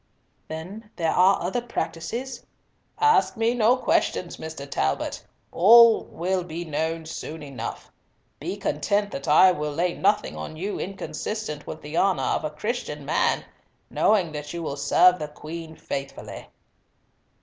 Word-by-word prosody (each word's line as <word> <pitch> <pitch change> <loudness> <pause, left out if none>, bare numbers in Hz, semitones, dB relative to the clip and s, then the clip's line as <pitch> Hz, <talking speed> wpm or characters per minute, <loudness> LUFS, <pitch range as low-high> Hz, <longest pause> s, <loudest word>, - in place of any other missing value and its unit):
"Then 185 +8 -8
there 165 -2 0
are 190 +2 +4
other 190 +8 -1
practices?" 235 +5 -4 0.6
"Ask 440 - +4
me 225 +1 +2
no 245 +1 +4
questions, 180 -7 0
Mr. 160 -3 -7
Talbot. 70 - -1 0.3
All 230 +5 +7
will 180 +2 -2
be 170 0 -6
known 160 +1 -2
soon 160 0 -7
enough. 135 -5 -7 0.5
Be 180 +7 -4
content 205 +1 0
that 135 - -6
I 170 +5 +7
will 150 -4 -2
lay 170 +4 0
nothing 205 +2 +1
on 155 - -6
you 200 +5 -3
inconsistent 185 -2 -5
with 155 - -7
the 150 +3 -5
honour 185 -9 +2
of - - 0
a 155 - -1
Christian 150 - -4
man, 150 - +1 0.5
knowing 190 -7 +2
that 150 -1 -6
you 170 - -4
will 140 - -3
serve 175 +6 +4
the 150 - -3
Queen 160 +2 -8
faithfully." 140 -2 -6
170 Hz, 145 wpm, -25 LUFS, 150-205 Hz, 0.6 s, All